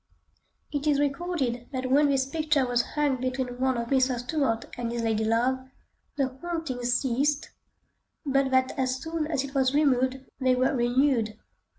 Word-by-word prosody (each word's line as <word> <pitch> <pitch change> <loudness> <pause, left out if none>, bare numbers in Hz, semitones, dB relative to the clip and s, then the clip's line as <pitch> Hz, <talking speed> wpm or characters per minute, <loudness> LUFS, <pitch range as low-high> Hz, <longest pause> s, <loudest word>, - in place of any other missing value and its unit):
It 290 0 -2
is 290 -2 +3
recorded 275 -5 -1
that 255 -1 -3
when 290 +2 +5
this 270 -1 +2
picture 300 -1 +1
was 245 -1 +2
hung 290 -3 +2
between 255 -1 -2
one 260 -1 +1
of 235 0 -3
Mr. 260 -2 +2
Stuart 245 -2 -1
and 235 -1 -3
his 235 -1 -2
lady 220 -1 +1
love, 235 +4 +2 0.6
the 270 -2 +1
hauntings 295 -9 -2
ceased, 275 +3 0 0.7
but 275 -1 +2
that 260 0 +2
as 255 -1 +1
soon 320 0 -3
as 290 -4 -1
it 275 0 -7
was 265 -1 +2
removed 265 -2 +2
they 255 -1 +3
were 260 +3 +1
renewed. 240 -3 +1
260 Hz, 165 wpm, -27 LUFS, 245-285 Hz, 0.7 s, when